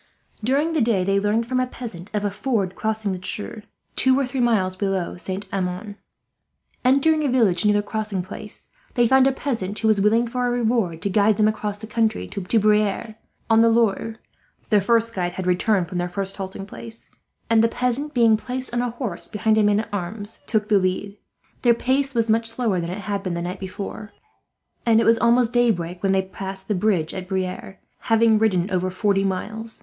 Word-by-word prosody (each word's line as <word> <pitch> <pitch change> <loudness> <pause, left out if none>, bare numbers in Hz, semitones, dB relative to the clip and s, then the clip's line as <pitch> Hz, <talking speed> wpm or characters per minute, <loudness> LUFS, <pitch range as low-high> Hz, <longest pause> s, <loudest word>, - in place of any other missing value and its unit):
During 285 +8 +1
the 315 - +1
day 225 -5 +2
they 195 +1 +2
learned, 210 +3 +1
from 255 +2 -1
a 255 - +1
peasant, 210 -8 -8
of 210 -1 -1
a 205 - 0
ford 200 -3 -1
crossing 220 -2 -1
the 185 -1 -5
Cher, 210 +3 -5 0.3
two 260 +1 +4
or 275 - +1
three 260 +1 -4
miles 210 -6 +2
below 190 -2 -2
Saint 190 +2 -5
Amand. 190 +2 -3 0.9
Entering 280 +4 +3
a 285 - +1
village 215 -9 +3
near 210 0 +4
the 205 - +1
crossing 210 -3 -3
place, 185 - -9 0.3
they 240 -2 +4
found 265 +2 +5
a - - +3
peasant 225 -8 -3
who 220 - 0
was 215 -2 +3
willing, 225 +4 +3
for 250 +1 -1
a - - +1
reward, 225 -8 0
to 200 - 0
guide 205 +1 +3
them 215 - +4
across 210 -1 -1
the 215 - -7
country 220 0 0
to 200 - -5
Briare, 210 +1 +1 0.3
on 225 0 +5
the 230 - +5
Loire 225 -1 +1 0.6
their 210 -2 +5
first 230 +2 +2
guide 175 -3 -2
had 185 0 -5
returned 180 +1 +2
from 180 0 -4
their 175 0 -2
first 195 +2 -4
halting 195 0 -6
place 225 +3 -11 0.4
and 225 -1 +4
the - - +5
peasant, 250 +5 -2
being 230 -2 +5
placed 255 +2 -4
on 240 - +1
a 245 - -1
horse 230 -7 -4
behind 215 +1 +1
a 220 - +4
man 205 0 +3
at - - -10
arms, 205 +3 -4
took 215 -1 0
the 205 -2 +4
lead. 190 +2 -2 0.5
Their 240 -2 +4
pace 270 +2 0
was 230 -1 +2
much 225 +1 +2
slower 225 -5 0
than 170 - -4
it 190 +3 -5
had 200 -1 -3
been 185 -3 -3
the 170 - -3
night 180 +1 -5
before, 195 +2 -7 0.7
and 225 -1 +4
it - - +2
was 230 0 +4
almost 235 0 +3
daybreak 185 -8 +1
when 195 - +1
they 190 0 +2
passed 190 0 -7
the 210 - 0
bridge 180 -5 0
at 185 -1 -6
Briare, 190 0 -3 0.2
having 225 -2 +3
ridden 190 -5 +2
over 185 0 0
forty 195 +1 +1
miles. 220 +4 -4
215 Hz, 210 wpm, -23 LUFS, 190-230 Hz, 0.9 s, found